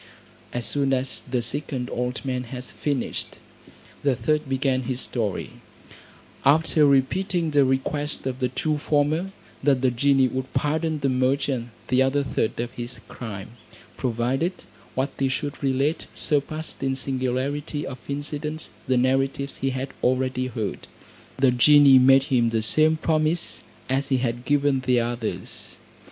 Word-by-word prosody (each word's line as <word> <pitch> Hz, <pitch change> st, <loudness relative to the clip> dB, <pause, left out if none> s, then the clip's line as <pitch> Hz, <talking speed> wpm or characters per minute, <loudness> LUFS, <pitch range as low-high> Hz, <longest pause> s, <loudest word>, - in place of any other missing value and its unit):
As 120 Hz, -2 st, -3 dB
soon 140 Hz, -2 st, +1 dB
as 130 Hz, 0 st, -1 dB
the 125 Hz, -2 st, 0 dB
second 130 Hz, 0 st, -2 dB
old 125 Hz, +2 st, -3 dB
man 125 Hz, -1 st, -2 dB
had 125 Hz, +1 st, -7 dB
finished, 140 Hz, 0 st, -3 dB, 0.7 s
the 140 Hz, -3 st, +2 dB
third 150 Hz, +4 st, 0 dB
began 130 Hz, -1 st, +1 dB
his 130 Hz, -1 st, 0 dB
story, 110 Hz, -7 st, -2 dB, 0.9 s
after 150 Hz, +1 st, +4 dB
repeating 165 Hz, +5 st, +1 dB
the 145 Hz, -1 st, +5 dB
request 135 Hz, +3 st, -1 dB
of 130 Hz, -1 st, -3 dB
the 130 Hz, -, +1 dB
two 150 Hz, +4 st, -1 dB
former, 155 Hz, +6 st, +1 dB, 0.3 s
that 135 Hz, -2 st, +2 dB
the 130 Hz, -, +4 dB
genie 135 Hz, +2 st, +3 dB
would 130 Hz, +1 st, -4 dB
pardon 155 Hz, +1 st, 0 dB
the 140 Hz, -, +2 dB
merchant 130 Hz, -1 st, 0 dB, 0.2 s
the 130 Hz, +1 st, +4 dB
other 135 Hz, +2 st, +2 dB
third 130 Hz, -5 st, -1 dB
of 120 Hz, 0 st, -2 dB
his 120 Hz, 0 st, -6 dB
crime, 110 Hz, 0 st, -8 dB, 0.4 s
provided 130 Hz, +8 st, 0 dB, 0.4 s
what 135 Hz, +2 st, 0 dB
he 135 Hz, -1 st, +2 dB
should 145 Hz, +2 st, -3 dB
relate 140 Hz, +3 st, 0 dB
surpassed 155 Hz, +2 st, -1 dB
in 135 Hz, -1 st, 0 dB
singularity 135 Hz, +3 st, -2 dB
of 130 Hz, -1 st, -7 dB
incidents 150 Hz, +2 st, -4 dB, 0.2 s
the 130 Hz, -1 st, +2 dB
narratives 135 Hz, +2 st, 0 dB
he 135 Hz, -, -1 dB
had 130 Hz, +1 st, -3 dB
already 130 Hz, 0 st, +1 dB
heard. 110 Hz, -6 st, -4 dB, 0.5 s
The 130 Hz, -1 st, +4 dB
genie 140 Hz, +2 st, +7 dB
made 135 Hz, +1 st, +6 dB
him 120 Hz, -2 st, +4 dB
the 115 Hz, -1 st, 0 dB
same 155 Hz, +7 st, +4 dB
promise 155 Hz, +1 st, 0 dB, 0.3 s
as 135 Hz, +2 st, 0 dB
he 135 Hz, -, +3 dB
had 120 Hz, -1 st, -2 dB
given 145 Hz, -1 st, +2 dB
the 125 Hz, -1 st, +2 dB
others. 120 Hz, -1 st, -4 dB
135 Hz, 145 wpm, -24 LUFS, 125-145 Hz, 0.9 s, genie